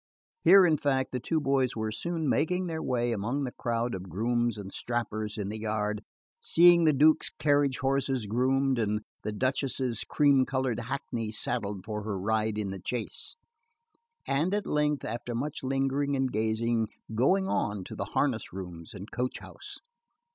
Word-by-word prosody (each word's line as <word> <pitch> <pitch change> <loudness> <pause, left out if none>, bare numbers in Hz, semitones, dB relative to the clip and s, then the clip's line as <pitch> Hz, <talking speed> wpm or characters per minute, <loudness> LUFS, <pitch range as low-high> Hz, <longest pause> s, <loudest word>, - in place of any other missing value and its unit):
Here 195 -1 +8
in 160 -3 +3
fact 135 -2 0
the 125 - -2
two 160 +6 0
boys 135 -3 +1
were 110 -1 -2
soon 165 +7 -2
making 180 +7 +1
their 160 -2 -3
way 120 -1 0
among 115 +6 -1
the 125 - -3
crowd 120 -1 -2
of 95 0 -6
grooms 120 +4 0
and 100 -2 -7
strappers 110 -3 -3
in 100 -2 -3
the 110 +1 -5
yard, 105 -1 -1 0.4
seeing 170 0 +6
the 155 - +6
Duke's 155 +3 +4
carriage 145 -3 +2
horses 135 -2 0
groomed, 130 +4 +1
and 105 -1 0 0.2
the 105 - -3
Duchess's 130 0 -1
cream 140 -3 +4
coloured 130 -3 -1
hackney 120 -2 -3
saddled 105 -3 -2
for 105 -1 -3
her 105 -2 -3
ride 110 +2 0
in 100 -2 -2
the 95 - -6
chase; 120 +5 -5 0.9
and 160 +8 +1
at 210 - -1
length, 150 -1 0
after 120 +1 -4
much 140 +5 -3
lingering 135 +1 0
and 135 -1 0
gazing, 110 +1 0 0.3
going 185 - +3
on 105 - -1
to - - -8
the - - -3
harness - - -1
rooms 90 -3 -8
and 100 +2 -9
coach 125 +1 -2
house. - - -10
125 Hz, 170 wpm, -29 LUFS, 110-140 Hz, 0.9 s, Here